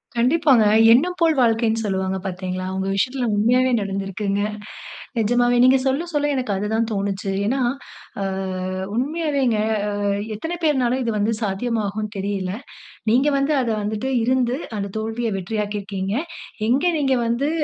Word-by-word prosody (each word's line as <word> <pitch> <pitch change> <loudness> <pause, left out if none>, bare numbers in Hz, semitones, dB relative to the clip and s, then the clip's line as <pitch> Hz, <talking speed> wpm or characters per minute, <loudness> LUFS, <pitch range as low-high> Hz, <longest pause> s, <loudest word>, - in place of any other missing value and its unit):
கண்டிப்பாங்க. 255 -1 +4 0.3
"எண்ணம் 350 +9 +2
போல் 325 -2 +3
வாழ்க்கைன்னு" 225 -2 +2
சொல்வாங்க 190 -1 -1
பார்த்தீங்களா? 185 0 -4
உங்க 190 0 -2
விஷயத்ல 250 +5 0
உண்மையாவே 250 +5 +3
நடந்திருக்குங்க. 195 0 -2 0.8
நிஜமாவே 245 +2 +2
நீங்க 260 +1 +6
சொல்ல, 280 +6 0
சொல்ல 295 0 +1
எனக்கு 255 -5 -1
அது 205 +2 -2
தான் 225 0 +1
தோனுச்சு. 195 -1 -2 0.2
ஏன்னா 265 +4 0 0.6
அ - - 0 0.7
உண்மையாவேங்க 280 -4 0 0.4
அ - - -1 0.3
எத்தன 325 +10 -4
பேர் 305 -2 +4
என்றாலும் 255 0 +1
இது 230 - -1
வந்து 215 +2 +1
சாத்தியமாகும்ன்னு 215 0 -2
தெரியல. 195 -1 -2 0.6
நீங்க 260 +5 +3
வந்து 275 +2 +1
அத 240 - -1
வந்துட்டு 215 +6 -2
இருந்து, 255 +1 +1 0.2
அந்த 200 0 -2
தோல்விய 225 +1 -2
வெற்றியாக்கி 205 +2 -3
இருக்கீங்க. 195 0 -3 0.5
எங்கே 300 +8 +3
நீங்க 270 -2 +2
வந்து 245 +6 0
230 Hz, 140 wpm, -22 LUFS, 200-260 Hz, 0.8 s, நீங்க